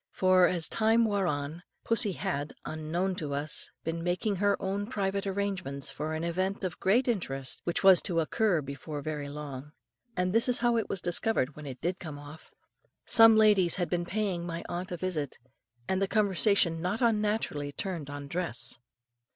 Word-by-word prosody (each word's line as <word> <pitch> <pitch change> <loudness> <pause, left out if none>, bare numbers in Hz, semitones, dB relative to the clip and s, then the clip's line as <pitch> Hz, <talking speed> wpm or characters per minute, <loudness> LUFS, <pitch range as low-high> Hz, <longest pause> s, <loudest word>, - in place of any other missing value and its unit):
For, 185 -1 +4
as 170 -3 +4
time 225 +1 +2
wore 200 -3 0
on, 145 +2 -3 0.2
pussy 230 -3 +1
had, 145 -2 -3
unknown 165 +5 -2
to 145 -4 -3
us, 145 +2 +1
been 165 +1 -3
making 180 +3 -1
her 200 +1 +1
own 200 +2 -2
private 200 -3 -2
arrangements 190 -9 -3
for 155 +4 -4
an 160 - -3
event 185 +4 -2
of 180 -3 -4
great 235 +7 +2
interest 135 - -2
which 170 - -1
was 190 -2 +7
to 170 -4 0
occur 170 0 +1
before 140 +2 -7
very 150 -2 -4
long. 145 -1 -8 0.4
And 180 +1 0
this 230 +3 +4
is 245 - +7
how 240 0 +2
it 225 -2 -1
was 190 - -2
discovered 175 -5 0
when 150 -1 -9
it 130 -2 -8
did 180 +2 -2
come 155 -4 -7
off. 145 +2 -12 0.6
Some 225 -1 +7
ladies 210 -5 +4
had 175 -2 -2
been 175 -1 0
paying 195 -4 -2
my 170 -1 -5
aunt 180 +2 -5
a 175 - -3
visit, 165 -6 -3 0.5
and 190 0 0
the 195 - +2
conversation 200 -4 +2
not 185 +7 -2
unnaturally 210 -10 0
turned 165 -3 -5
on 145 0 -7
dress. 140 -7 -1
180 Hz, 180 wpm, -29 LUFS, 150-200 Hz, 0.6 s, was